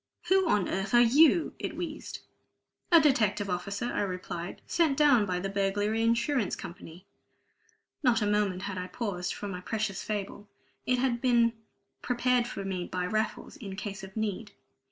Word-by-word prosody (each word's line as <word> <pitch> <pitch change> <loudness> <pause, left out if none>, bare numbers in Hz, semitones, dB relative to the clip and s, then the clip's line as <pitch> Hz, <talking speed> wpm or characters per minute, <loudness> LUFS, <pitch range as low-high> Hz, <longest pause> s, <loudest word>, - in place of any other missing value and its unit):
"Who 380 -2 +4
on 205 - +2
earth 195 +5 -1
are - - +8
you?" 300 +8 +5
it - - -4
wheezed. - - -6 0.7
"A 335 - +9
detective 215 -9 +2
officer," 200 +5 -3
I 245 - -1
replied, 180 -2 -5
"sent 320 -5 +1
down 250 -9 +5
by 180 -1 -1
the 190 - -3
Burglary 205 +3 0
Insurance 235 +1 +1
Company." 170 +2 -10 1.0
Not 245 -5 +3
a 210 - 0
moment 205 -3 0
had 200 -2 -4
I 180 - -4
paused 180 -3 -3
for 205 - -6
my 180 -2 -5
precious 215 -1 -2
fable. 205 0 -5 0.4
It 250 - +3
had 260 +1 +2
all 235 - -2
been 235 -2 +3 0.5
prepared 245 0 +1
for 200 -5 -6
me 185 -2 -3
by 180 -1 -2
Raffles, 215 +3 -2
in 195 -5 -7
case 200 -1 -6
of 190 +2 -10
need. 215 0 -3
210 Hz, 170 wpm, -29 LUFS, 190-240 Hz, 1.0 s, A